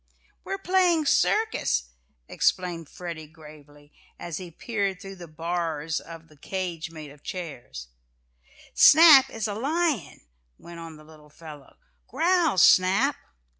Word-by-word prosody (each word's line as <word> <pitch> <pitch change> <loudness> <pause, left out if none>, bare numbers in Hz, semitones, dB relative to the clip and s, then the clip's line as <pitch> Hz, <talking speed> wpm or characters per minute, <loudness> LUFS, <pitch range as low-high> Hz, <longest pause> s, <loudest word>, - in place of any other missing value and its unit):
"We're 390 - -4
playing 360 -4 +1
circus," 65 - 0 0.4
explained 170 -4 -1
Freddie 170 -3 -8
gravely, 150 -2 -17 0.2
as 170 -3 -6
he 180 -2 -8
peered 200 +2 -3
between 195 0 -11
the 175 - -10
"bars" 160 -1 -3
of 165 0 -12
the 155 - -21
cage 175 0 -5
made 155 -3 -11
of 145 0 -18
chairs. 120 - -8 0.8
"Snap 300 -4 +8
is 225 -1 -4
a 205 - -4
lion," 285 - -2 0.4
went 170 0 -12
on 165 -2 -10
the 155 - -16
little 155 -1 -18
fellow. 150 -2 -14 0.3
"Growl, 340 - +1
Snap!" 195 +11 +4
170 Hz, 130 wpm, -25 LUFS, 155-225 Hz, 0.8 s, Snap